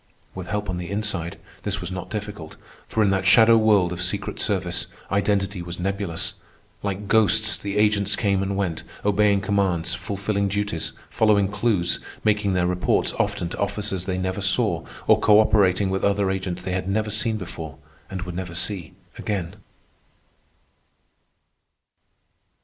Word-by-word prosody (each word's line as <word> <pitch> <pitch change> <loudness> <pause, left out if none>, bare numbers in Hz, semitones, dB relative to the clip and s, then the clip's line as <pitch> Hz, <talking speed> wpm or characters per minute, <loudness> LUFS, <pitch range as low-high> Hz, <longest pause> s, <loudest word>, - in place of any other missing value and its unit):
With 95 -1 -7
help 105 -1 -2
on 90 - -2
the 90 -1 -5
inside, 100 -5 -2 0.2
this - - 0
was 90 +1 -5
not 90 -1 -5
difficult, 105 -6 -6 0.3
for 110 - +1
in 100 - +3
that 95 -1 +1
shadow 110 +4 +7
world 105 -5 +4
of 90 - -5
secret 90 0 -1
service - - 0 0.2
identity 100 -1 0
was 85 0 -7
nebulous. 95 -2 -2 0.5
Like 100 0 -3
ghosts 110 +1 +4
the 100 0 -4
agents 105 -1 +2
came 100 -3 +1
and 100 0 -2
went, 90 -5 -1 0.2
obeying 105 -1 +3
commands, 95 -5 +1
fulfilling 100 0 -2
duties, 100 -4 -2 0.2
following 105 -3 +3
clews, 105 -4 +1 0.2
making 105 -2 +2
their 90 -1 +2
reports 90 0 +1
often 85 - 0
to - - -7
officers 100 -2 -1
they 95 -1 -2
never 95 +2 -2
saw 95 -1 +1 0.2
or - - +5
cooperating 105 -3 +4
with 95 - -1
other 100 -1 +2
agents 95 -2 -3
they 95 - -3
had 90 +1 -2
never 105 +1 0
seen 110 +1 0
before 80 -5 -7 0.3
and 95 -2 -4
would 90 -1 -6
never 90 -1 -5
see 90 -1 -2 0.3
again. 95 -3 -3
100 Hz, 150 wpm, -24 LUFS, 90-105 Hz, 0.5 s, shadow